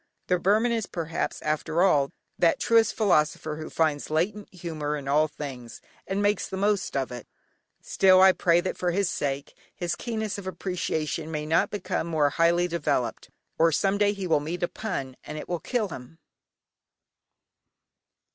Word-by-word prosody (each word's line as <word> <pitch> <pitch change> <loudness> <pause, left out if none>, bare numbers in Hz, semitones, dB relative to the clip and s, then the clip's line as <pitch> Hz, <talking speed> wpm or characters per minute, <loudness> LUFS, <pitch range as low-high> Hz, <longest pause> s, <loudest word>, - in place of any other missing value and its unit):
The 180 -1 +3
Burman 215 +6 +3
is, 225 -3 -1
perhaps, 165 -1 -3
after 155 +3 0
all 145 -8 +3 0.3
that 170 -1 +3
truest 225 -2 +3
philosopher 155 -6 +1
who 155 0 -6
finds 155 -3 0
latent 195 +7 -1
humour 155 -4 -4
in 140 -2 -8
all 150 +3 +3
things, 135 -6 -8 0.3
and 195 +1 -1
makes 205 +1 +1
the 190 - -4
most 200 -5 0
of 135 -2 -2
it 120 -2 -8 0.6
still, 185 -1 +5
I 190 0 +8
pray 175 -1 +3
that, 185 - -4
for 180 - +1
his 190 +1 +1
sake, 140 -1 -3 0.2
his 175 -1 -2
keenness 220 -4 -3
of 190 - -8
appreciation 165 -4 -3
may 150 -1 -3
not 160 +2 +2
become 185 -4 -3
more 155 -3 +2
highly 170 +3 +3
developed, 145 -8 -1 0.3
or 165 0 +5
some 195 +5 +1
day 205 -1 +4
he 200 -2 -5
will 165 -4 +3
meet 165 +5 -4
a - - +2
pun, 140 -14 -5
and 150 - -7
it - - -7
will 175 -1 -2
kill 215 +3 -1
him. 130 +1 -10
170 Hz, 170 wpm, -26 LUFS, 150-195 Hz, 0.6 s, I